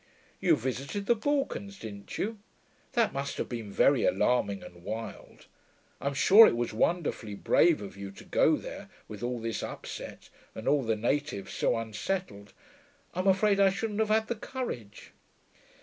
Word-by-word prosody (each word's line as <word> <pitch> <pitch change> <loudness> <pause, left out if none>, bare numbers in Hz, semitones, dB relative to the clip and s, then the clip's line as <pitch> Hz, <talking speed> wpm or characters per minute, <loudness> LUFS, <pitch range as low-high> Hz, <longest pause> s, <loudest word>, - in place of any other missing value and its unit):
'You - - +4
visited 135 - -3
the 235 - +5
Balkans, 235 -5 -2
didn't 100 - -8
you? 215 +1 -2 0.5
That 235 -4 +2
must 140 +1 -3
have - - -2
been 115 -4 -6
very 135 +5 +4
alarming 100 -5 +1
and 85 0 -13
wild. 110 +4 -7 0.6
I'm 140 0 -1
sure 205 +10 +8
it - - +1
was 120 -1 -2
wonderfully 120 - 0
brave 160 +5 +3
of 100 - -8
you 100 0 -7
to - - -12
go - - +3
there, - - -8 0.2
with 105 -2 -9
all 120 0 -2
this 115 0 -3
upset, - - -7 0.2
and 110 - -7
all 145 -1 +4
the 115 -3 0
natives 120 -2 -2
so - - +1
unsettled. 110 - -4 0.6
I'm 185 +2 -1
afraid 200 +1 +4
I 195 -1 +6
shouldn't 210 +2 -3
have 220 -1 +2
had 220 +1 +3
the - - 0
courage.' 210 - -6
135 Hz, 165 wpm, -29 LUFS, -, 0.6 s, sure